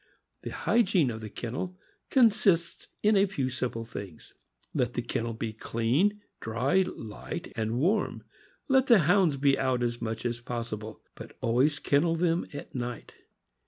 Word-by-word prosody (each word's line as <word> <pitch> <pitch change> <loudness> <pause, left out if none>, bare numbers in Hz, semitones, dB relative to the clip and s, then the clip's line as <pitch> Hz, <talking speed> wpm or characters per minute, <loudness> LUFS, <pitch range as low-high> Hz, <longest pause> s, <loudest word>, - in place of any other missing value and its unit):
The - - -5
hygiene 185 - +2
of 110 0 -6
the 110 - -6
kennel 130 - -5 0.3
consists 210 -9 +3 0.2
in 210 +1 +5
a 200 0 +4
few 135 -9 -2
simple 120 -2 -3
things. 100 -7 -9 0.4
Let 120 -1 0
the 120 - -1
ken 115 -1 -2
nel 115 - -3
be 110 -1 -4
clean, 130 - 0 0.2
dry, 125 +11 +1
light, 110 -2 -7
and 110 +1 -1
warm. 185 - +1 0.4
Let 265 -1 +4
the 230 -7 +7
Hounds 175 -2 +3
be 140 0 +3
out 130 -2 +1
as 120 -1 -2
much 115 +1 -4
as 120 -1 -1
possible, 115 -3 -6
but - - -11
always 130 +6 +2
kennel 160 +4 +2
them 170 0 +1
at 145 -2 -8
night. 120 -2 -5
130 Hz, 160 wpm, -28 LUFS, 115-180 Hz, 0.4 s, the